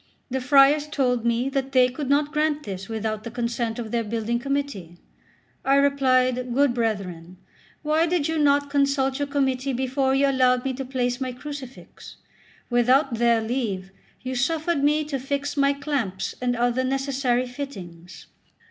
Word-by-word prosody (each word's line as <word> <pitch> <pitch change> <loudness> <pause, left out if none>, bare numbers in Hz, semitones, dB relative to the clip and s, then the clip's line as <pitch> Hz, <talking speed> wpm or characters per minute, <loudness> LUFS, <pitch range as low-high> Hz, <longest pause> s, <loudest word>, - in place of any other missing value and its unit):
The 265 0 -1
friars 280 +3 +5
told 250 -6 0
me 235 +2 +1
that 270 0 -3
they 255 -1 +6
could 260 +2 -5
not 290 +1 +2
grant 300 -1 0
this 195 -1 -7
without 220 -1 -3
the 230 - -6
consent 235 -1 -2
of 225 -3 -5
their 235 -1 0
building 230 +2 -2
committee. 275 -11 -3 0.7
I 275 - +3
replied: 255 -3 +2
"Good 280 -2 +3
brethren, 185 -7 -3 0.5
why 310 +2 +2
did 335 -4 0
not 285 0 +4
you - - -15
consult 275 -1 +1
your 285 - -1
committee 270 -1 0
before 265 +1 0
you 280 +1 +3
allowed 255 -2 +2
me 265 - -1
to 265 +1 -5
place 250 -1 -2
my 260 -1 -2
crucifix? 270 0 -10 0.6
Without 255 +3 +3
their 235 -1 +3
leave 220 -6 -3 0.3
you 255 0 -3
suffered 310 +4 0
me 300 +1 +3
to 290 -2 -4
fix 280 +2 -3
my 280 -1 +3
clamps 275 -10 -3
and 245 -1 0
other 245 +2 +1
necessary 265 -2 0
fittings." 190 -10 -9
260 Hz, 160 wpm, -24 LUFS, 235-280 Hz, 0.7 s, they